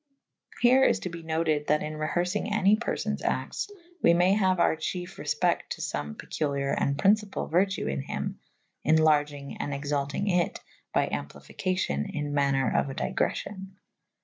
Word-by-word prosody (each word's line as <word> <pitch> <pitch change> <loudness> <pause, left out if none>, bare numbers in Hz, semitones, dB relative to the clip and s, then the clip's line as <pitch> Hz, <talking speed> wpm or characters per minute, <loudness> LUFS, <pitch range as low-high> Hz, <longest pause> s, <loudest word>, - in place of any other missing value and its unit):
Here 255 +2 +6
is - - +3
to 180 - -3
be 170 -1 -7
noted 160 -2 0
that 150 0 +2
in 155 - -4
reherfynge 175 +7 -1
any 205 -1 +4
persowes 235 +2 -2
actes - - -2 0.2
/ 350 +1 -28
we 170 - +5
may 180 +2 +4
haue 190 -3 +3
our 170 - +3
chiefe 175 +3 -4
refpecte - - 0
to - - -5
fome 75 0 -3
peculiare 140 -2 -2
and 140 0 0
pryncypall 205 +3 +1
vertue 190 +3 +2
in 70 0 -1
hym - - -4 0.2
/ - - -47
enlargynge 145 -2 +1
and 145 - -2
exaltynge 140 +5 -2 0.2
it - - -7 0.3
by - - +2
amplificacio« 180 - -3
in 145 -1 -2
maner 140 -4 +2
of - - +2
a 135 - -6
digreffio«. 195 -1 -2
160 Hz, 160 wpm, -28 LUFS, 145-190 Hz, 0.3 s, Here